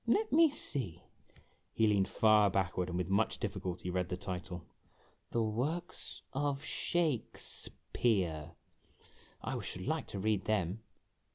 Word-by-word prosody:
" - - -32
Let 435 +1 -2
me 325 +1 +7
see," 130 - -2 0.7
he 110 - +3
leaned 100 -3 +3
far 110 -2 +5
backward, 90 -1 0
and 90 - -2
with 90 -2 -1
much 100 +3 +2
difficulty 90 -3 -3
read 90 0 -1
the 90 - -2
title: 90 -3 -5 0.3
" - - -35
'The 115 - +1
Works 145 +11 -3
of 140 +1 0
Sha 160 -8 +1
kfs - - +2 0.2
peare.' 85 -9 +1 0.9
I - - -2
should - - -4
like - - -1
to - - -4
read 105 0 +1
them." 105 -1 0
105 Hz, 150 wpm, -34 LUFS, 90-125 Hz, 0.9 s, me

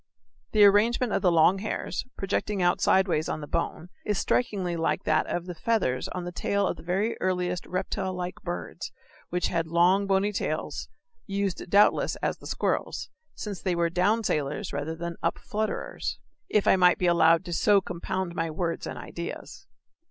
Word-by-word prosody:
The 215 -1 +6
arrangement 215 +3 +4
of - - +1
the 180 - +4
long 170 +3 +5
hairs, 215 - -3
projecting 200 +1 -1
out 175 -1 +2
sidewise 185 -5 +3
on - - -2
the - - -5
bone, 170 +3 -3
is 210 -2 -1
strikingly 190 -3 0
like 165 -1 0
that 155 0 +2
of 175 - -2
the 180 - -5
feathers 170 - 0
on 180 - -5
the 175 - -5
tail 200 +3 0
of - - -1
the - - -10
very 195 +6 0
earliest 180 -1 -1
reptile 185 +1 -2
like 180 0 -5
birds 175 -1 -5 0.4
which 180 0 0
had 165 -2 -1
long 180 +4 +3
bony 195 +1 +2
tails, - - -3 0.4
used 195 -2 -2
doubtless 200 +3 +4
as - - -2
the - - -10
squirrel's, - - -2 0.2
since 200 -6 -6
they 185 -2 0
were 170 -1 +1
down 205 +6 +2
sailers 150 +2 -2
rather 145 +3 -3
than 170 0 -5
up 165 - 0
flutterers 215 0 -3 0.3
if 210 - +2
I - - +6
may 180 -1 +6
be 180 - -2
allowed 170 0 +4
to 175 - -4
so 205 +4 +4
compound 180 0 -4
my 165 -1 -1
words 165 +1 -3
and - - -6
ideas. 170 0 -7
180 Hz, 180 wpm, -27 LUFS, 170-200 Hz, 0.4 s, The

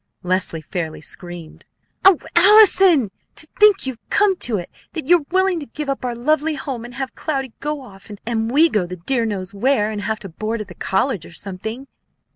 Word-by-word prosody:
Leslie 180 -3 -1
fairly 160 0 -4
screamed. 175 0 -5 0.4
"O 385 -3 +7 0.2
Allison! 375 - +6 0.2
To 310 - -7
think 420 -5 +5
you 265 - -1
have 230 - -26
come 405 -2 +3
to 235 -9 0
it 175 - -7 0.2
that 320 -5 -5
you're 335 -1 +3
willing 375 -1 +2
to 290 - -8
give 295 +4 -6
up 275 - -2
our 245 -1 -2
lovely 305 +5 +1
home, 265 -6 -5
and 240 0 -10
have 265 0 -4
Cloudy 270 -6 -3
go 295 0 -3
off, 200 -5 -14 0.2
and 225 -1 -1
we 300 +7 +5
go 210 - 0
the 180 - -6
dear 230 +6 -1
knows 195 -2 -4
where, 215 0 +1
and 210 -1 -4
have 220 +2 -2
to 195 - -8
board 215 +7 -4
at 210 -2 -7
the - - -9
college 195 - -1
or - - -13
something." 220 +8 -6
240 Hz, 205 wpm, -20 LUFS, 195-305 Hz, 0.4 s, O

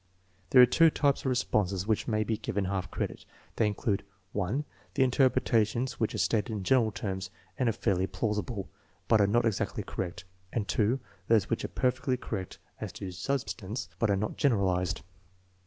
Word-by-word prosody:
There 125 -1 +9
are - - +10
two 165 +7 +5
types 145 -2 +2
of - - -16
response 100 -7 +1
which 110 -1 0
may 110 -1 +1
be 110 +1 -1
given 100 -1 -2
half 95 0 -2
credit. - - -4 0.3
They 110 - +3
include 105 -1 -1 0.3
(1) 105 +9 -1 0.3
the 135 - +4
interpretations 125 -2 +2
which 110 -1 0
are - - -2
stated 105 +5 +1
in 105 -3 -3
general 115 0 +3
terms 95 -2 -4 0.3
and 125 -3 +3
are - - +1
fairly 95 -2 +1
plausible, 105 -2 -2 0.4
but 110 -2 +5
are 100 - +5
not 120 +4 +3
exactly 110 -4 -1
correct; 90 -1 -5 0.3
and 105 -4 -2 0.4
() 95 -2 -30
those 110 -4 +3
which - - 0
are - - -1
perfectly 125 0 0
correct 100 -6 -5 0.2
as - - -4
to 95 - -6
substance, 110 -1 -3
but 115 - +2
are 100 - +4
not 105 +2 -2
generalized. 95 - +1
105 Hz, 175 wpm, -30 LUFS, 95-120 Hz, 0.4 s, are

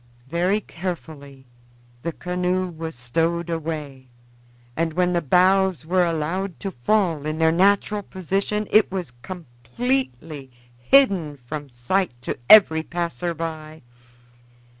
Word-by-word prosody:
Very 180 +5 +1
carefully 155 -8 -7 0.6
the 170 - -3
canoe 180 +2 -2
was 160 -2 -6
stowed 165 +8 -1
away, 150 -5 -5 0.7
and 165 0 -1
when 180 +1 +1
the 175 - +1
boughs 185 0 +3
were 180 +2 +2
allowed 170 +3 -2
to 195 - -3
fall 165 - 0
in 155 0 -2
their 160 0 +3
natural 200 +4 +2
position 195 +3 -2
it 215 -2 +4
was 180 -10 -4
completely 150 - -4 0.3
hidden 175 - +3
from 145 +3 -7
sight 120 +3 -1
to - - -3
every 175 -7 +8
passer 170 +1 -3
by. 160 -1 -6
170 Hz, 120 wpm, -23 LUFS, 150-185 Hz, 0.7 s, every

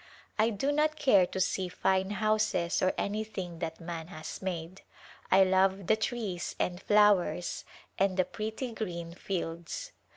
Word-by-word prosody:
I 220 +1 +5
do 230 +6 0
not 305 +1 +2
care 230 -12 +5
to 190 - -4
see 185 0 0
fine 190 +1 +1
houses 215 -4 +1
or 185 - +3
anything 200 -5 -3
that 165 -2 -4
man 165 -1 -6
has 155 -4 -7
made. 180 -1 -4 0.5
I 190 +1 +7
love 190 +1 +2
the 220 - +4
trees 215 -6 -3
and 180 0 -1
flowers 205 -4 +3 0.3
and 195 -1 +2
the 185 - +3
pretty 220 +4 -4
green 170 -7 -5
fields." 175 - -4
190 Hz, 150 wpm, -30 LUFS, 175-215 Hz, 0.5 s, I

